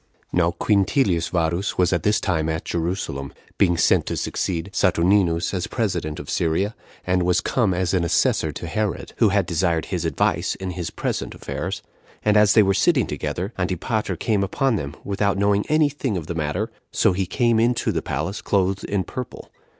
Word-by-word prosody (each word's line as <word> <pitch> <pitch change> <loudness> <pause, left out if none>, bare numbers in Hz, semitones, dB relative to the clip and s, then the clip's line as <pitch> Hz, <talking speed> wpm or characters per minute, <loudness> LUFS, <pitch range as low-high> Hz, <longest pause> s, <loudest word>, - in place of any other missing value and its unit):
2. - - -2
Now 85 -1 +3
Quintilius 100 - +2
Varus 85 +3 -1
was 90 0 +3
at 85 - +1
this 105 +4 +2
time 80 -6 0
at 80 0 -3
Jerusalem, 80 -5 -3 0.3
being 85 -3 +3
sent - - +3
to - - -2
succeed 85 +1 -2
Saturninus 90 -1 +2
as 90 -2 -2
president 90 -10 -2
of - - -8
Syria, 85 +6 0 0.3
and 90 0 +2
was 90 0 +2
come 115 -7 +1
as 90 0 0
an 90 -2 +2
assessor 85 - +2
to - - -7
Herod, 105 +3 -2
who 110 - +4
had 100 -1 +2
desired 85 -1 0
his 90 -3 -3
advice 80 - 0
in 95 -1 -5
his 85 -2 -4
present - - -3
affairs; - - -5 0.4
and 105 0 +4
as 105 -1 +6
they 110 - +6
were 95 0 +2
sitting 130 - +3
together, 90 - -4
Antipater 95 +5 -1
came 105 -3 0
upon 125 +5 +1
them, 75 -7 -4
without 100 -1 0
knowing 100 0 +2
any 155 -1 +4
thing 135 -7 -2
of 85 - -5
the 85 - -4
matter; 85 +8 -2 0.2
so 110 - +3
he 95 0 -1
came 120 +2 +2
into 120 +1 +2
the - - -1
palace 80 +9 -3
clothed 95 -1 0
in 100 -2 -1
purple. 125 +5 -7
95 Hz, 190 wpm, -23 LUFS, 85-105 Hz, 0.4 s, as